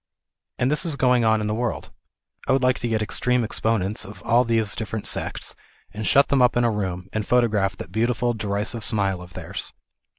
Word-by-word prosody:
And 125 +3 +1
this 150 +4 +3
is 165 -5 0
going 125 -3 +3
on 110 -1 +3
in - - -2
the 105 - -1
world. 120 +1 -3 0.6
I - - +3
would 135 -1 +2
like 130 0 +2
to 120 - -2
get 110 -2 0
extreme 125 +3 0
exponents 110 -2 0
of 100 +2 -11
all 120 +2 +4
these 115 -3 +1
different 110 -1 -4
sects, - - -3 0.4
and 110 +1 -4
shut 140 +1 +4
them 140 -2 +3
up 125 -1 +4
in 120 - +3
a 120 - +3
room, 95 -3 -3
and 110 - -1
photograph 105 -5 +1
that 90 - -8
beautiful 120 +3 0
derisive 105 +1 -2
smile 100 -5 +1
of 90 0 -13
theirs. - - -5
110 Hz, 205 wpm, -23 LUFS, 105-125 Hz, 0.6 s, all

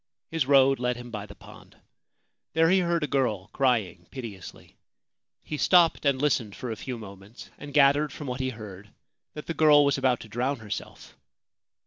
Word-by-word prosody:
His 160 -5 -1
road 135 -1 +5
led 125 0 -1
him 120 0 -10
by 105 -2 -6
the 100 - -13
pond. - - -16 0.8
There 165 +1 +3
he 190 - +4
heard 170 -2 0
a - - -1
girl 110 -9 -1
crying 110 -10 0
piteously. 115 -8 -10 0.7
He 150 - -5
stopped 170 -2 +4
and 135 -2 +2
listened 125 -8 0
for 125 - -6
a - - -3
few 125 +3 -6
moments, 100 +1 -12
and 145 - -9
gathered 145 +1 +4
from 150 - -8
what 125 -1 -4
he 130 0 -1
heard 105 -4 -10 0.5
that 150 - -7
the 165 - -3
girl 150 -2 +5
was 140 -1 +1
about 130 -2 +1
to - - -10
drown 125 +6 -2
herself. 105 -4 -8
130 Hz, 180 wpm, -26 LUFS, 110-145 Hz, 0.8 s, road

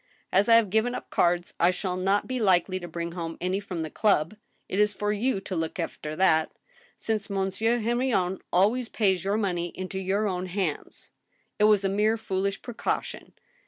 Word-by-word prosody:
As 200 +4 +4
I 230 - +8
have 225 -5 +4
g^iven 225 +4 +1
up - - -8
cards, 175 0 +1
I 170 - +5
shall 180 0 -2
not 195 +2 +1
be 255 -1 -2
likely 185 -2 +2
to 175 - -7
bring 170 0 -4
home 165 -2 -5
any 185 +2 -1
from 185 -5 -5
the 155 - -6
club. 200 -3 +2 0.3
It 195 - -2
is 210 -1 +3
for 210 +1 -1
you 220 +1 0
to 190 - -5
look 160 +1 -3
after 155 -3 -4
that, 160 -3 +3 0.5
since 215 -2 -2
Monsieur 200 +4 0
Hen 235 +1 0
rion 190 -8 0
always 220 +6 +2
pays 190 -5 +1
your 200 +2 0
money 180 -5 -1
into 185 +1 -4
your 195 +3 0
own 185 -1 -2
hands.... 180 -5 -4 0.5
It 210 - +5
was 210 -2 +4
a - - +2
mere 210 +3 +2
foolish 195 -2 -2
precaution 240 -3 -4
195 Hz, 195 wpm, -27 LUFS, 180-215 Hz, 0.5 s, I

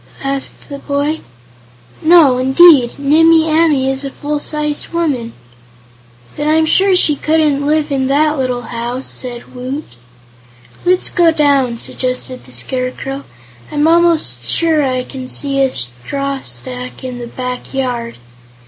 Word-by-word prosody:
asked 275 0 -4
the 280 -1 -7
boy. 285 +3 -2 0.8
"No, 310 -6 +5
indeed; 265 -1 +5
Nimmie 320 +3 +4
Amee 310 -4 +2
is 270 +1 -1
a 275 - -3
full 295 +2 -4
sized 300 0 -3
woman." 285 -9 -2 1.0
"Then 295 - -3
I'm 315 +1 +3
sure 380 +4 +3
she 310 -4 +3
couldn't 305 -1 +1
live 300 +1 0
in 265 -1 0
that 300 +3 +2
little 250 -2 -2
house," 240 +3 -5
said 245 -2 -5
Woot. 255 +4 -5 1.0
"Let's 365 0 +3
go 345 -2 +4
down," 280 -6 +2
suggested 255 +1 -4
the 125 - -15
Scarecrow. 255 - -4 0.5
"I'm 295 +1 +1
almost 335 -1 +2
sure 325 -2 +1
I 255 -2 -1
can 260 0 -8
see 275 +1 0
a 265 -1 +2
straw 265 - -3
stack 125 +1 -7
in 250 -1 -6
the 240 - -6
back 250 +1 -6
yard." 245 -3 -3
275 Hz, 140 wpm, -15 LUFS, 255-310 Hz, 1.0 s, No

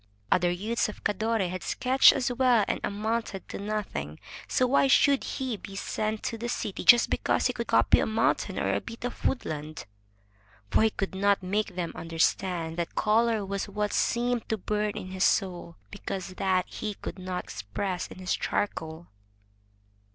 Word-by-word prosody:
Other 180 -1 +4
youths 210 +6 -1
of 210 - -10
Cadore 215 -1 0
had 185 +1 -5
sketched 260 +1 +5
as 255 -3 -1
well 245 -4 +3
and - - -1
amounted 215 -1 -2
to - - -6
nothing. 200 - -4 0.3
So 255 - +2
why 275 +2 +4
should 280 0 +4
he 255 -4 -3
be 195 0 -10
sent 215 +2 -2
to 230 - -3
the 240 +1 -3
city 215 -4 -3
just 240 - +7
because - - +1
he - - +2
could - - -4
copy - - +4
a - - +1
mountain 225 +1 0
or - - 0
a - - 0
bit 230 +1 -8
of 245 - -6
woodland? 155 - -3 0.9
For - - +4
he 220 - +5
could 195 -2 -4
not 200 0 +2
make 200 0 -1
them 175 -2 -2
understand 165 0 -1
that 170 -1 -3
color 220 -1 +2
was 200 +1 -3
what 210 +1 -2
seemed 240 0 0
to 220 - 0
bum 210 +1 -1
in 185 - -6
his 190 0 -1
soul, 175 -4 0 0.2
because 195 -2 -5
that 185 0 0
he 215 -2 -5
could 195 - -7
not 185 -1 -4
express 175 - -4
with 185 0 -10
charcoal. 160 -5 -2
205 Hz, 175 wpm, -28 LUFS, 185-225 Hz, 0.9 s, just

